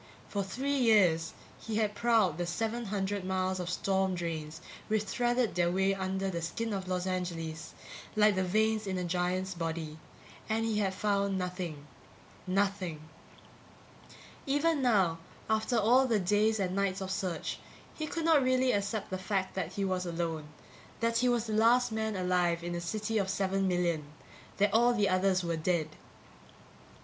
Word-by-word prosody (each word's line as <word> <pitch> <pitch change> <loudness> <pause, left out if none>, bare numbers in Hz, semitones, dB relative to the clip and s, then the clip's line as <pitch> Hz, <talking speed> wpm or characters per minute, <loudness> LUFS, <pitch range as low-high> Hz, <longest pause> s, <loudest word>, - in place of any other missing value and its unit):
For 200 -1 -2
three 265 +9 -2
years 185 -9 +3 0.2
he 220 - -5
had 215 -1 +1
prowled 215 -8 +2
the 175 - -1
seven 225 +6 -2
hundred 200 -1 -2
miles 185 0 -1
of 180 -1 -3
storm 190 0 0
drains 160 -3 -4 0.3
which 215 -1 +1
threaded 240 +3 0
their 175 -1 +2
way 190 +2 +2
under 190 0 -2
the 170 -1 -3
skin 220 +7 -3
of 190 -2 -4
Los 180 -1 -1
Angeles 170 -3 -4 0.4
like 210 0 +5
the 190 -1 0
veins 215 +3 +1
in 190 -1 -1
a 180 - -2
giant's 180 +2 -1
body 160 -2 -4 0.5
and 225 +1 +1
he 220 -2 0
had 190 -2 0
found 200 -1 0
nothing. 180 -5 -4 0.6
Nothing. 185 -5 -1 1.4
Even 290 +2 +2
now, 195 -10 +3 0.3
after 220 +2 +1
all 245 +5 +4
the 230 -3 +2
days 210 +3 +2
and 185 -1 -1
nights 195 -1 0
of 190 0 -4
search, 180 -4 -3 0.3
he 310 - -4
could 330 +1 -3
not 320 -3 +5
really 255 0 +3
accept 205 0 -2
the 185 - -2
fact 190 0 -1
that 180 -2 -3
he 200 - -1
was 185 -1 -1
alone, 165 -2 -3 0.5
that 230 0 +1
he 250 +1 +3
was 240 -2 +1
the 220 - -3
last 235 +3 +4
man 220 -1 -2
alive 180 -2 +1
in 175 0 -3
a 175 - -3
city 215 +5 -1
of 195 -1 -1
seven 195 0 0
million, 175 -4 0 0.5
that 205 +1 +2
all 240 +2 +4
the 205 -3 +2
others 185 0 +2
were 170 -1 -1
dead. 160 -1 0
195 Hz, 170 wpm, -31 LUFS, 180-220 Hz, 1.4 s, like